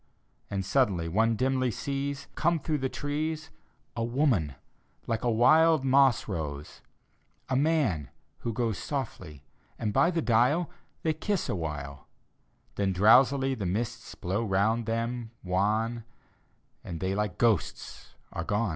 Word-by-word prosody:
And 95 -2 -2
suddenly 100 -8 +1
one 110 +6 +2
dimly 130 +2 +1
sees, 140 +3 -3
Come 170 +2 +1
through 155 -1 -1
the 130 0 -1
trees, 155 +3 -3 0.4
A 115 - -1
woman, 115 - +1 0.5
like 115 -1 -2
a 120 - +2
wild 155 +6 +5
moss 135 -2 +4
rose: 75 -7 -5 0.7
A 130 - +1
man, 135 - +1 0.3
who 115 - -3
goes 115 -3 -1
Softly: 75 -2 -5 0.3
and 105 -2 -2
by 170 - +4
the 170 -2 -1
dial 125 +9 +2 0.3
They 160 - +2
kiss 195 +4 -2
a - - 0
while: 75 -5 -5 0.7
Then 100 -2 +1
drowsily 130 +7 +5
the 100 -8 -3
mists 110 +6 -3
blow 95 +6 -2
round 110 +3 +1
them, 115 +1 -2
wan, 110 +5 0 0.8
And 85 -2 -6
tJiey 95 +2 -1
like 105 -4 -2
ghosts 110 - -1 0.2
are 85 - -3
gone. 105 +4 0
115 Hz, 140 wpm, -28 LUFS, 95-135 Hz, 0.8 s, wild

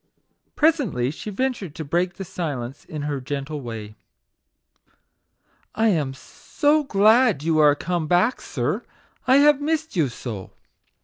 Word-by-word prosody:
Pre 315 +2 +5
sently 165 - -2
she 210 - -7
ventured 210 - -3
to 160 - -5
break 175 +4 0
the 195 - -6
silence 145 -8 -5
in 150 -2 -6
her 145 -2 -3
gentle 140 +2 -4
way 115 -4 -6
t( 105 - -18 1.8
I 225 0 +3
am 150 -8 0
so 295 - 0
glad 215 - +4
you 160 -1 +2
are 150 -1 +6
come 170 +1 -2
back, 180 +9 +2
sir; - - -2 0.4
I 260 - +6
have 290 0 +5
missed 315 -1 -1
you 160 -5 +2
so 110 -5 -7
170 Hz, 145 wpm, -23 LUFS, -, 1.8 s, are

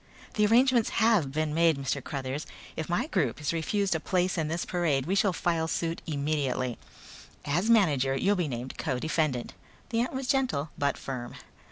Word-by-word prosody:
"The 210 -1 +3
arrangements 240 +1 +4
have 220 -11 +3
been 155 +1 -1
made, 165 -1 +4
Mr. 140 0 -2
Cruthers. 140 +1 -4 0.3
If 160 - -4
my 175 +9 +1
group 165 - 0
is 150 +2 -1
refused 190 +4 0
a 160 - 0
place 180 +2 0
in 160 -3 -1
this 165 +3 -2
parade 155 -7 0
we 180 - -1
shall 200 0 +3
file 165 -2 0
suit 165 +1 -2
immediately. 140 -4 -1 0.7
As 175 +10 0
manager 145 - +4
you'll 200 +9 +2
be 175 -4 0
named 125 -1 -6
co 135 -6 -1
defendant." 150 -4 -1 0.4
The 230 0 +1
ant 250 - -2
was 265 0 -3
gentle 250 - 0
but 140 0 0
firm. 125 -3 -6
160 Hz, 180 wpm, -28 LUFS, 140-195 Hz, 0.7 s, arrangements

